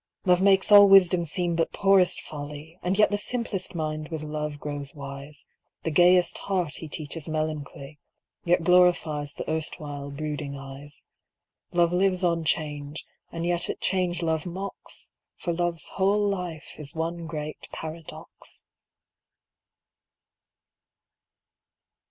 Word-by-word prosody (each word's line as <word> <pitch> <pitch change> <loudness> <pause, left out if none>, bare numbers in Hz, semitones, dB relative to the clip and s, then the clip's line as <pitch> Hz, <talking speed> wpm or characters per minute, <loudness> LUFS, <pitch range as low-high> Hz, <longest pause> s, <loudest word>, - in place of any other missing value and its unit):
Love 180 -1 +4
makes 195 +1 +4
all 205 -1 +10
wisdom 185 -2 +6
seem 170 +2 -1
but 165 0 0
poorest 195 -2 +3
folly, 150 +3 -8
And 185 +2 0
yet 210 - +5
the 205 - 0
simplest 220 -5 -3
mind 155 -1 -3
with 160 -2 -4
Love 150 -1 -4
grows 145 -1 -6
wise, 140 +1 -9 0.4
The 165 - -1
gayest 175 +3 +4
heart 180 -6 -2
he 160 - -7
teaches 155 +1 -6
melancholy, 155 -2 -4 0.4
Yet 175 -1 +2
glorifies 165 -5 +3
the - - -6
erstwhile 150 -2 -4
brooding 145 -1 -4
eyes. 135 +1 -11 0.7
Love 175 0 +3
lives 185 0 +2
on 170 -2 +2
change, 150 -1 -2 0.3
and 165 0 -4
yet 175 0 0
at - - -3
change 180 -2 0
Love 160 +1 0
mocks, 190 +3 -7 0.3
For 170 - -2
Love's 170 -2 -2
whole 205 +2 +2
life 180 -5 -4
is 150 +2 -8
one 165 +1 -3
great 150 0 -6
paradox. 160 0 -9
165 Hz, 130 wpm, -26 LUFS, 150-180 Hz, 0.7 s, all